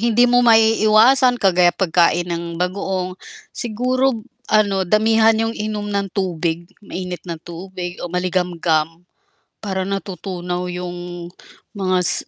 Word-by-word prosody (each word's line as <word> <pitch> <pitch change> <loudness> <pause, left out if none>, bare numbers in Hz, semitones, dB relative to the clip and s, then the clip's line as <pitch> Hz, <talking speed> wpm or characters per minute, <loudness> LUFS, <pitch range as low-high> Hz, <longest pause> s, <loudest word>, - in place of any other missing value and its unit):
hindi 235 +1 +3
mo 245 0 +4
maiiwasan 225 +2 +5
kagaya 180 -5 +3
pagkain 175 -1 +2
ng 170 -1 -4
bagoong, 185 +1 -2 0.4
siguro 250 +1 -1 0.2
ano, 205 -2 +2
damihan 220 +2 +4
'yong 225 +1 0
inom 210 -1 -4
ng 200 -1 -1
tubig, 175 -2 -3
mainit 180 -4 -6
na 170 - -4
tubig 175 +2 -8
o 175 - -4
maligamgam. 175 -3 0 0.8
Para 190 -2 -2
natutunaw 180 -2 -4
'yong, 175 -1 -6 0.4
mga 185 -3 0
s - - 0
190 Hz, 115 wpm, -19 LUFS, 175-215 Hz, 0.8 s, maiiwasan